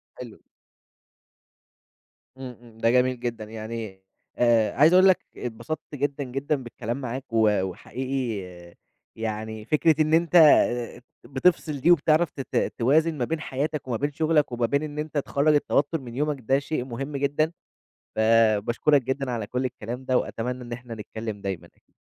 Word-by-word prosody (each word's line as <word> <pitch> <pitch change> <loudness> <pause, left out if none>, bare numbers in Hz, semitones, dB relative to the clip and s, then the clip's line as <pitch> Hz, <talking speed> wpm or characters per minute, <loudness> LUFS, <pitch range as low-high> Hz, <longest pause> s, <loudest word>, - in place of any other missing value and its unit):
حلو. 120 -4 -10 2.0
امم، 125 -3 -8
امم، 115 -2 -17
ده 115 0 +2
جميل 125 0 +2
جدًا 120 -3 -4
يعني، 110 -2 -7 0.3
آآ 115 -3 +3
عايز 155 +6 +5
أقول 185 +1 +7
لك 185 - +3
اتبسطت 125 +7 -5 0.2
جدًا، 140 +1 -2
جدًا 135 +4 -2
بالكلام 120 +2 -5
معاك، 130 +1 -5
و 105 -3 +3
وحقيقي 120 +2 -4 0.7
يعني 110 0 -5
فكرة 155 +3 +3
إن 155 +1 +1
أنت 170 +1 +2
آآ 125 -7 +5 0.2
بتفصل 150 +1 0
دي 160 +7 +4
وبتعرف 160 0 +3
ت 135 - -6
ت - - -1
توازن 155 +6 +2
ما 125 - 0
بين 160 +5 -2
حياتك 145 -1 -3
وما 120 -3 -1
بين 145 +1 -1
شغلك 155 -1 +1
وما 120 -1 0
بين 140 +5 0
إن 150 0 -6
أنت 155 0 -4
تخرّج 145 +2 +2
التوتر 145 +2 +1
من 120 -2 -9
يومك 150 +1 -1
ده 135 +4 +2
شيء 140 -3 -3
مهم 135 +4 -5
جدًا، 145 +3 0 0.7
فـباشكرك 115 +5 +3
جدًا 130 +1 -2
على 115 -4 -3
كلّ 125 +3 -2
الكلام 125 0 -5
ده، 130 -1 +2
وأتمنى 125 +2 -4
إن 120 0 -9
إحنا 120 -1 -7
نتكلّم 110 0 -6
دايمًا. 90 -4 -8
130 Hz, 160 wpm, -25 LUFS, 115-145 Hz, 2.0 s, أقول